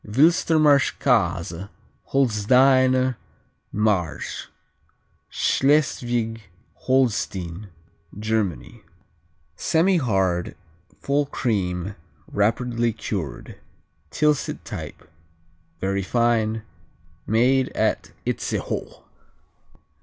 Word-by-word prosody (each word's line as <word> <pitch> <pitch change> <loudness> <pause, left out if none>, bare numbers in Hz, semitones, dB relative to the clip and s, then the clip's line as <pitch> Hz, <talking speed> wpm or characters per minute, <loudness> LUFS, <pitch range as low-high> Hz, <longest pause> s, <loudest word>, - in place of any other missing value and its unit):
Wilstermarsch 150 +3 +4
Käse 85 +3 0 0.4
Holsteiner 130 +1 +3 0.5
Marsch 100 -6 -1 0.8
Schleswig 120 -5 +1 0.5
Holstein, 105 -7 0 0.5
Germany 105 - -2 0.7
Semihard; 110 - +1 0.4
full 140 +1 0
cream; 95 -7 -2 0.3
rapidly 115 +3 0
cured; 95 - -5 0.5
Tilsit 150 - 0
type; - - -8 0.7
very 100 +2 -1
fine; 110 +1 +1 0.6
made 125 +4 +3
at - - 0
Itzehoe. - - -3
115 Hz, 55 wpm, -23 LUFS, 100-130 Hz, 0.8 s, Wilstermarsch